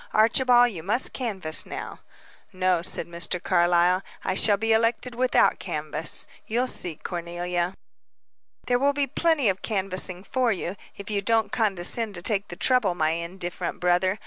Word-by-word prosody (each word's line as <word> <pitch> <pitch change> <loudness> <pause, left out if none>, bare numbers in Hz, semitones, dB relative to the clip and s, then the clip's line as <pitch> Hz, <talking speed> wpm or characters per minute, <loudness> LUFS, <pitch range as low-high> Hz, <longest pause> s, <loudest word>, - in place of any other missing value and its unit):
Archibald, 245 +2 +4
you 175 -6 -7
must 215 +9 +1
canvass 190 -11 -2
now." - - -7 0.5
"No," 185 -2 +1
said 175 - -2
Mr. 170 +1 -3
Carlyle, 175 +1 +2 0.2
"I - - -1
shall 205 +2 +4
be 225 +2 +1
elected 230 +2 +1
without 255 +1 +2
canvass. - - 0 0.2
You'll 240 +3 0
see, 175 -9 -3
Cornelia." 175 +1 -3 0.9
"There 245 0 +1
will 280 +2 +2
be 285 0 +1
plenty 280 - +1
canvassing 190 -2 -1
for 255 +1 0
you, 185 -2 -3 0.2
if 200 +1 -8
you 200 -1 0
don't 225 +2 +1
condescend 215 -1 +1
to 175 - -8
take 205 0 0
the 175 - -8
trouble, 215 -3 +2
my 155 -2 +1
indifferent 175 +1 -5
brother. 180 +2 +1
195 Hz, 150 wpm, -25 LUFS, 175-230 Hz, 0.9 s, Archibald